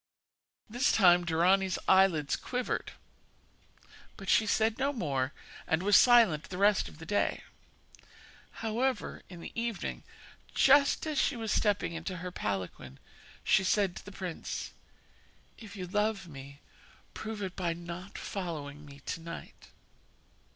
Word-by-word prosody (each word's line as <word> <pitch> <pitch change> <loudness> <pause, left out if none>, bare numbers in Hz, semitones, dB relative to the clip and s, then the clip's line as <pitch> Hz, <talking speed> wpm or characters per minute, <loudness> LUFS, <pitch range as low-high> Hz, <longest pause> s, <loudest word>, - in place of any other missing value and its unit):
This 245 +4 +1
time 175 -4 +6
Dorani's 180 +3 +2
eyelids 185 -7 +4
quivered; 250 -1 -3 1.2
but 195 - -7
she 215 - +4
said 220 +2 +1
no 275 +1 +1
more, 140 - -1 0.4
and 160 +3 +1
was 205 0 +4
silent 225 -12 +6
the 180 - -7
rest 200 +1 +3
of - - -15
the 160 - -10
day. 205 +5 0 1.2
However, 250 +4 -1
in 175 -2 -10
the - - -8
evening, 230 -1 -3 0.5
just 280 +2 +5
as 305 -3 -1
she 280 - +1
was 225 -2 -3
stepping 205 -5 +1
into 170 +3 -5
her 180 +2 -6
palanquin, 95 - -4 0.5
she 190 - +4
said 190 -1 +1
to - - -9
the 205 - -10
prince: 185 -4 -5 0.9
'If 215 -3 -11
you 185 -2 -5
love 210 +1 -1
me, 140 -1 -11 0.5
prove 215 -1 -5
it 190 -1 -5
by 175 -3 -1
not 175 +3 -8
following 150 -6 -5
me 140 -1 -13
to 165 - -4
night.' 165 0 -9
190 Hz, 135 wpm, -30 LUFS, 165-215 Hz, 1.2 s, time